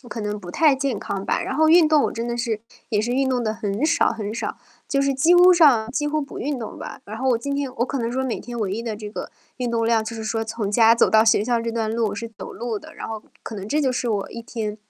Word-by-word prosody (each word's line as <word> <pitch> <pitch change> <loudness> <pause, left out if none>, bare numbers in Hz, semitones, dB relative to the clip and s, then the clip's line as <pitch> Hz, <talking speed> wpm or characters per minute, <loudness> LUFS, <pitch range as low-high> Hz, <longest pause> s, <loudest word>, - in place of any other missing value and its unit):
我 - - -11
可 230 - -5
能 210 0 -3
不 180 -3 -9
太 300 - +4
健 270 -5 -1
康 195 0 -4
吧。 - - 0
然 - - -3
后 315 0 +4
运 330 -2 +7
动 305 -2 +4
我 - - -1
真 230 +1 -4
的 235 - -2
是， 230 -3 -2 0.3
也 210 -3 +2
是 235 +3 -1
运 265 +1 +1
动 250 -2 0
得 215 -1 -1
很 210 +3 -2
少 335 - +3
很 215 -2 -5
少， - - -4 0.3
就 275 - 0
是 275 0 +1
几 320 +7 +4
乎 355 +1 +8
上 270 -10 +5
几 295 +3 -1
乎 305 +1 0
不 280 - -7
运 285 -1 -2
动 225 - -7
吧。 - - -8
然 215 - -7
后 260 +3 0
我 235 - +2
今 280 +3 -3
天 270 -3 -3
我 240 - +1
可 275 - -3
能 235 -1 -2
说 260 +1 -1
每 260 -3 -2
天 240 -1 -7
唯 195 -3 -1
一 220 +4 -3
的 230 -2 -3
这 210 0 -7
个 - - -6 0.3
运 250 -2 -2
动 230 -1 0
量 225 -1 +2
就 225 +1 -5
是 225 - -6
说 225 +1 -2
从 220 -2 -3
家 225 +1 +6
走 235 - +4
到 220 0 +5
学 220 -2 +4
校 240 +1 +1
这 230 0 -2
段 225 -1 -1
路 220 -2 0
是 230 +3 -5
走 - - -7
路 230 -2 -4
的， - - -14
然 - - -7
后 220 -1 -6 0.2
可 225 - -7
能 195 - -6
这 295 +8 +1
就 270 -3 +2
是 245 -1 -2
我 200 -2 -2
一 230 - -7
天， 220 -3 -4
235 Hz, 325 characters per minute, -23 LUFS, 220-265 Hz, 0.3 s, 乎